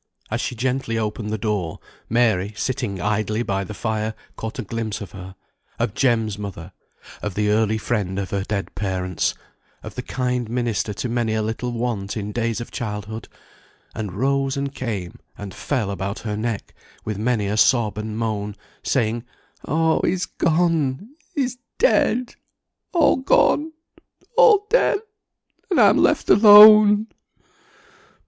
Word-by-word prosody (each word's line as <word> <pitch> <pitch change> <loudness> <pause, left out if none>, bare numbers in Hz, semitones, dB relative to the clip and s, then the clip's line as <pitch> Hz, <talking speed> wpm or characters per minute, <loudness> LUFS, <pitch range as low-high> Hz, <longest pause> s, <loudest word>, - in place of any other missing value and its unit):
As - - -1
she - - -3
gently 125 -1 -1
opened 105 0 -3
the 110 - -2
door, 100 -6 -2 0.3
Mary, 110 -4 +2
sitting 120 -7 -2
idly 105 +3 -1
by 100 -3 -1
the 105 +2 -8
fire, 110 0 -2 0.2
caught 110 0 -6
a - - -3
glimpse 115 -4 -4
of 95 -4 -8
her, 95 0 -10 0.4
of 100 - -1
Jem's 110 -5 +1
mother, 95 -3 -7 0.5
of 105 -4 -4
the 105 0 +1
early 110 0 +2
friend 105 -5 -2
of 100 -1 -3
her 100 -1 -1
dead 100 -1 -4
parents, 95 -2 -2 0.5
of - - -8
the - - -5
kind 125 -2 -2
minister 120 -3 -1
to 125 - -3
many 115 -2 -1
a 110 - 0
little 115 +3 -3
want 115 -4 -3
in 105 0 -4
days 115 0 -1
of 120 - -7
childhood, 105 -1 -5 0.7
and 105 -4 -5
rose 135 +5 0
and 140 0 -3
came 105 -10 -5 0.2
and 100 -2 -7
fell 115 -9 -2
about 100 +1 -4
her 105 -2 -3
neck, 110 -1 -4 0.3
with 105 -2 -3
many 115 -2 0
a 100 +2 -1
sob 110 -1 +3
and 105 0 -5
moan, 105 -2 -2 0.3
saying, 115 -2 0 0.4
"Oh, 160 +2 +2
he's 185 -1 0
gone 165 - 0 0.3
he's 255 -3 -1 0.2
dead 250 - +2 0.6
all 340 -3 +4
gone 310 - +2 0.6
all 450 -4 +6
dead, - - +3 0.7
and - - +2
I - - +8
am - - +3
left - - +2
alone!" 210 0 +9
110 Hz, 150 wpm, -22 LUFS, 105-130 Hz, 0.7 s, alone